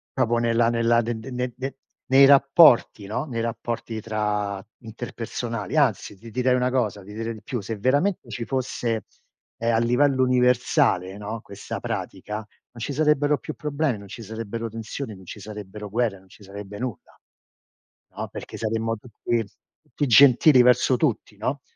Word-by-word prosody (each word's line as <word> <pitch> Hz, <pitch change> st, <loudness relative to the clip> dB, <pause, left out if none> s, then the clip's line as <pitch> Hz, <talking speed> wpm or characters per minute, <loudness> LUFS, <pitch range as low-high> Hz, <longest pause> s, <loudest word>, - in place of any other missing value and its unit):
Proprio 120 Hz, +1 st, +2 dB
nella 115 Hz, 0 st, +2 dB
nella 115 Hz, 0 st, +3 dB
de 115 Hz, 0 st, -3 dB
de 125 Hz, +4 st, -9 dB
ne 125 Hz, 0 st, -3 dB
de 135 Hz, +2 st, -5 dB, 0.4 s
nei 135 Hz, +1 st, +8 dB
rapporti, 135 Hz, -, +6 dB
no, 115 Hz, +6 st, -2 dB
nei 120 Hz, -6 st, -4 dB
rapporti 115 Hz, 0 st, -4 dB
tra 105 Hz, -2 st, -2 dB, 0.2 s
interpersonali. 115 Hz, +1 st, -5 dB
Anzi, 120 Hz, -7 st, +1 dB
ti 115 Hz, +3 st, -12 dB
direi 125 Hz, +2 st, +2 dB
una 125 Hz, 0 st, +1 dB
cosa, 110 Hz, -6 st, -1 dB
ti 105 Hz, +2 st, -11 dB
direi 115 Hz, +1 st, -3 dB
di 110 Hz, -, -13 dB
più: 120 Hz, +2 st, -4 dB
se 110 Hz, +3 st, -4 dB
veramente 145 Hz, -, +1 dB
ci 120 Hz, -, -4 dB
fosse, 120 Hz, -4 st, -2 dB, 0.5 s
ehm, 115 Hz, 0 st, +1 dB
a -, -, +3 dB
livello 130 Hz, +3 st, +3 dB
universale, 125 Hz, -, +2 dB
no, 105 Hz, +2 st, -5 dB
questa 100 Hz, -3 st, -7 dB
pratica, 105 Hz, +2 st, -4 dB
non 110 Hz, 0 st, -7 dB, 0.3 s
ci 130 Hz, -, -3 dB
sarebbero 150 Hz, 0 st, +2 dB
più -, -, -7 dB
problemi, 150 Hz, -3 st, -1 dB
non 100 Hz, 0 st, -12 dB
ci 115 Hz, -, -9 dB
sarebbero 115 Hz, +1 st, -5 dB
tensioni, 115 Hz, +2 st, -6 dB
non 95 Hz, -, -14 dB
ci 105 Hz, -, -9 dB
sarebbero 105 Hz, 0 st, -8 dB
guerre, 110 Hz, -1 st, 0 dB
non 95 Hz, 0 st, -22 dB
ci 105 Hz, -, -18 dB
sarebbe 100 Hz, +1 st, -9 dB
nulla, 120 Hz, -5 st, -6 dB, 1.0 s
no, -, -, -4 dB
perché -, -, -8 dB
saremmo 115 Hz, 0 st, -1 dB
tutti 115 Hz, 0 st, -3 dB, 0.4 s
tutti 145 Hz, -, -2 dB
gentili 130 Hz, +2 st, +7 dB
verso 125 Hz, +1 st, +4 dB
tutti, 115 Hz, -7 st, -1 dB
no, 130 Hz, +6 st, -2 dB
115 Hz, 165 wpm, -24 LUFS, 105-130 Hz, 1.0 s, nei